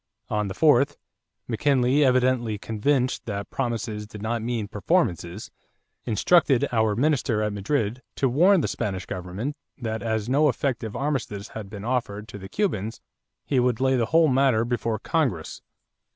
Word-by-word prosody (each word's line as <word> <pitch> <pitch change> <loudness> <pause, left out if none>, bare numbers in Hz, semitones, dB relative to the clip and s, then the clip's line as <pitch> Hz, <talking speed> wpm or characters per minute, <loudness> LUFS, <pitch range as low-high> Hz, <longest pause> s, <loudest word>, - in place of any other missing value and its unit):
On 105 -1 0
the 95 - -5
4th, 145 -2 +4 0.5
McKinley, 130 +3 +2
evidently 125 -4 +2
convinced 125 +6 0
that 100 -2 -4
promises 115 -4 -3
did 105 -1 -10
not 110 +2 -2
mean 115 -2 -2
performances, 100 - -1 0.5
instructed 130 - +3
our 110 -3 +2
minister 125 -4 +1
at 105 -1 -1
Madrid 110 +3 -1
to 135 - +1
warn 175 +9 +4
the - - 0
Spanish 95 -3 -3
government 95 +9 -4 0.2
that 110 -3 -3
as 110 -2 -1
no 145 +4 +4
effective 115 -4 -2
armistice 125 -8 -2
had 105 -3 -8
been 100 0 -8
offered 115 -4 -2
to 105 - -8
the 95 0 -9
Cubans, 115 - -2 0.5
he 135 - +1
would 125 -2 +1
lay 130 0 +3
the 115 -3 +1
whole 165 0 +4
matter 130 -4 +3
before 115 -2 -1
Congress. 120 - -1
120 Hz, 150 wpm, -25 LUFS, 105-135 Hz, 0.5 s, 4th